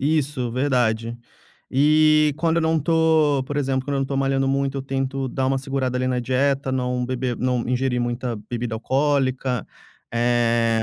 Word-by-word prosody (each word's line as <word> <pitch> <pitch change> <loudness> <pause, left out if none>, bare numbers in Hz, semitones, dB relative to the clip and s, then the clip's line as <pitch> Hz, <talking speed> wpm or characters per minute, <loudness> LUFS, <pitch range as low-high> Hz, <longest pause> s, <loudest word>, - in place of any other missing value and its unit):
Isso 145 -4 0
verdade. 120 -3 0 0.5
Eh, 155 +2 +4
quando 165 +1 +1
eu - - +3
não 160 0 +2
tô 160 -2 +2
por 145 - -4
exemplo, 135 -2 0
quando 140 -1 -1
não 135 - 0
tô 135 0 -3
malhando 135 0 +1
muito, 135 0 0
eu - - -4
tento 135 0 -2
dar 130 +1 -1
uma 135 0 +1
segurada, 135 -2 -2
ali, 130 - -1
na 125 -1 0
dieta, 135 +2 0
não 125 -1 -1
beber 125 -1 -2
não 125 -1 0
ingerir 125 0 0
muita 120 0 -2 0.2
bebida 120 -1 -3
alcoólica, 130 0 0 0.5
eh 115 -1 +2
130 Hz, 165 wpm, -22 LUFS, 125-140 Hz, 0.5 s, Eh